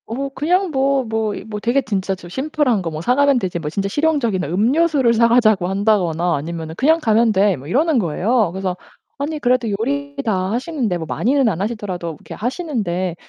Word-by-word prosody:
어 270 +5 -3
그냥 350 +7 0
뭐, 270 -1 +1
뭐 220 -1 -1
이 - - -7
뭐 210 -1 -5
되게 240 +6 +1
진짜 195 -4 -2
좀 175 -2 -12
"심플한 265 - 0
거 170 - -3
뭐 155 0 -5
사가면 275 +5 +3
되지 180 -5 -3
뭐 150 -2 -4
진짜 195 +5 -2
실용적인 280 -8 0
음료수를 250 - +2
사가자고 225 -5 +3
한다거나 185 -4 +1
아니면 160 +2 -5
그냥 315 +5 +3
가면 225 -4 +3
돼." 200 -1 +3
뭐 135 +2 -11
이러는 285 - +2
거예요. 205 +4 +1
그래서 190 -1 -2 0.4
"아니 300 +2 -3
그래도 245 -3 +1
요리 280 +5 -3
다 190 -3 0
하시는데 245 - -1
뭐 165 - -5
많이는 265 - +1
안 185 -3 -3
하시더라도 200 -5 -3
이렇게 - - -10
하시는데 215 - -2
220 Hz, 400 characters per minute, -19 LUFS, 185-275 Hz, 0.4 s, 사가면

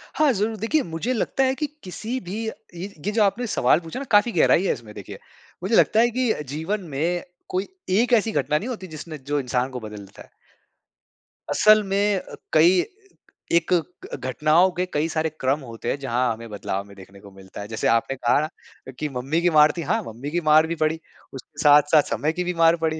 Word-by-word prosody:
हाँ, 305 -3 +4
जरूर 215 +2 -1
देखिए 255 +9 +1
मुझे 165 +10 -3
लगता 265 +3 0
है 260 0 +1
कि 300 - -2 0.2
किसी 220 +8 -5
भी 185 -1 -7
ये 220 - -3 0.5
ये 210 - 0
जो 215 -1 +3
आपने 220 +5 0
सवाल 150 - +3
पूछा 165 +9 -7
ना 280 - -5
काफ़ी 205 +3 +5
गहराई 170 0 +4
है - - +2
इसमें 110 -3 -11
देखिए। 100 - -9 0.4
मुझे 205 +5 +1
लगता 220 - +4
है 240 +1 +5
कि 250 -3 +2 0.2
जीवन 190 +7 -2
में 140 - -2 0.5
कोई 185 +2 -2 0.3
एक 245 +1 +2
ऐसी 225 -1 +3
घटना 150 +1 +1
नहीं 225 - -4
होती 200 -7 -6
जिसने 155 0 -8
जो 145 +2 -2
इंसान 125 0 -1
को 125 - -5
बदल 105 -2 -9
देता 100 - -15
है। - - -15 1.2
असल 215 0 +5
में 200 +1 +1
अ, - - -11 0.2
कई 170 +4 +5 0.8
एक 170 +2 0
क 175 +1 -3
घटनाओं 155 +8 +3
के 180 - +1
कई 150 +2 +1
सारे 160 0 -1
क्रम 135 +3 +1
होते 115 -3 -6
हैं - - 0
जहाँ 125 -2 0
हमें 115 0 -10
बदलाव 100 -1 -4
में 100 -1 -15
देखने 95 +1 -14
को 100 0 -14
मिलता 95 +1 -11
है। 100 - -7
जैसे 110 0 -2
आपने 115 +4 +1
कहा 120 +2 +2
ना, 155 - -1 0.4
अ, - - -7
कि 150 - -2
मम्मी 135 +6 -2
की 175 - +3
मार 150 +1 +7
थी, - - -2
हाँ, 225 0 +1
मम्मी 125 +7 -7
की 175 - 0
मार 155 +1 +6
भी 170 - -2
पड़ी 155 +1 +1 0.3
उसके 135 +3 -11
साथ-साथ 150 +1 +6
समय 155 +2 0
की - - +1
भी 180 - -2
मार 165 0 +6
पड़ी। 160 0 0
160 Hz, 220 wpm, -23 LUFS, 130-205 Hz, 1.2 s, मार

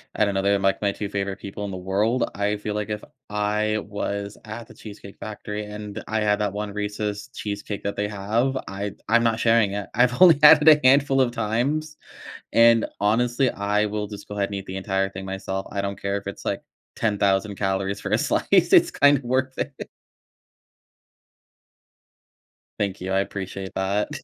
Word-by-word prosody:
I - - +3
don't 100 -1 -2
know, 95 - 0
they're, 100 0 +3
like, 95 0 +1
my 100 -1 +1
2 100 0 -5
favorite 100 -1 -3
people 100 +1 -6
in 100 - -5
the 95 - -5
world, 100 +7 0
I 100 +1 0
feel 105 0 -4
like 105 0 -3
if 105 0 -4 0.3
I 105 +1 0
was 100 0 -4
at 110 +1 -8
The 110 - -15
Cheesecake 100 -2 -11
Factory 105 0 -6
and 105 0 -7
I 110 - -1
had 105 -1 +2
that 105 -2 -1
one 105 0 -4
Reese's 105 0 -4
cheesecake 105 0 -5
that 100 - -2
they 105 0 -1
have, 110 +6 0
I 100 +1 -4 0.2
I'm 115 +1 +4
not 115 -1 +1
sharing 115 -4 +3
it. 100 -2 -4
I've 125 +5 +2
only 175 -5 +8
had 150 0 +9
it 150 - 0
a 150 -1 +7
handful 135 0 +4
of 130 -2 +3
times, 125 +8 -1 0.6
and, 115 0 +5
honestly, 120 +5 +2
I 105 +1 0
will 105 0 -3
just 105 -1 -9
go 105 - -7
ahead 100 -1 0
and 100 - -5
eat 95 0 -6
the 95 - -6
entire 95 0 0
thing 95 0 -7
myself. 95 0 -4
I 100 - -2
don't 100 0 -4
care 100 0 -1
if 100 - -6
it's, 100 - -7
like, - - -2 0.4
10,000 100 -2 +1
calories 95 0 -1
for - - -5
a - - +3
slice. - - 0
It's - - +5
kinda 145 -1 +4
worth 130 +1 -1
it. 140 - -5 2.9
Thank 100 -3 -2
you, 95 +1 -4
I 95 - +3
appreciate 95 -1 -5
that. 100 +2 0
105 Hz, 195 wpm, -24 LUFS, 100-115 Hz, 2.9 s, had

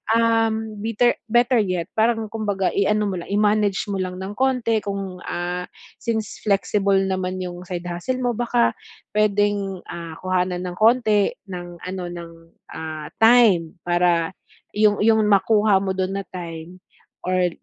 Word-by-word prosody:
um, 225 -2 +1
bitter 230 +2 +2
better 240 +2 +4
yet 185 -4 -2
parang 225 0 +2
kumbaga 205 -4 -1
iano 210 +2 +2
mo 190 -3 -2
lang, 170 - -9
i-manage 205 -1 +2
mo 195 - -2
lang 185 -1 -3
ng 190 +1 -5
konti 250 -3 +1
kung, 195 -2 -4
ah, 180 +1 -3 0.3
since 220 -2 -3
flexible 200 0 +2
naman 185 -1 -1
yung 180 0 -6
side 175 -1 -4
hustle 175 +9 -3
mo 245 - +2
baka 240 +1 +2 0.4
pwedeng, 205 -2 +1
ah, 165 -1 -7
kuhanan 180 -1 0
ng 175 - -6
konti 215 -2 +4 0.2
ng 175 -1 -7
ano 185 0 -4
ng, 170 -1 -8 0.4
ah, 155 -1 -6 0.2
time 220 -9 +5
para 175 -1 +2 0.5
yung 210 -1 +3
yung 220 0 +4
makuha 210 0 +4
mo 190 -1 -2
dun 190 0 -1
na 195 - -6
time 170 -1 -8 0.5
or 180 0 +2
195 Hz, 145 wpm, -22 LUFS, 180-220 Hz, 0.5 s, time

